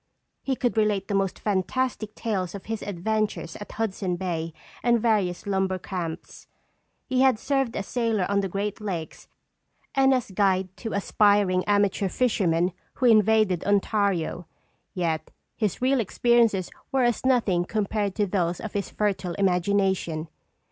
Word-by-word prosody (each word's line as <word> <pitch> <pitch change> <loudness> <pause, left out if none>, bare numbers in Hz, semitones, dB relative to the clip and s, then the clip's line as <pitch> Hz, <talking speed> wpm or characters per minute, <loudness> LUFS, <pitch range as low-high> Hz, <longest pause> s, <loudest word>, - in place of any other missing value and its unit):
He 270 - -1
could 245 -2 -1
relate 210 -2 +1
the - - -1
most 195 -1 0
fantastic 215 +2 -1
tales 195 -5 -2
of 200 - -8
his 225 -1 -4
adventures 205 -2 -2
at 205 - -9
Hudson 195 -4 -2
Bay 170 -3 -3 0.3
and 240 -1 +3
various 210 -6 +1
lumber 190 -1 0
camps. 175 -3 -6 0.6
He 255 -1 +1
had 265 -4 +5
served 270 0 0
as 200 - -3
sailor 225 -5 0
on 200 0 +1
the 195 -1 -1
Great 200 +3 -3
Lakes 175 -7 -5 0.7
and 270 0 +4
as 250 -6 0
guide 190 -1 +1
to 225 - -5
aspiring 200 -2 +3
amateur 205 -1 +2
fishermen 180 -7 +1 0.2
who 255 - -1
invaded 215 -5 +4
Ontario, 200 -4 0 0.5
yet 160 -3 -1 0.3
his 215 +1 -2
real 265 +1 +3
experiences 230 -3 +2 0.2
were 265 -2 +2
as 240 -1 +1
nothing 230 -9 +2
compared 205 0 -1
to 210 - +1
those 180 -3 -1
of 220 - -6
his 200 -1 -2
fertile 195 -4 -1
imagination. 190 -3 +1
200 Hz, 145 wpm, -25 LUFS, 185-220 Hz, 0.7 s, had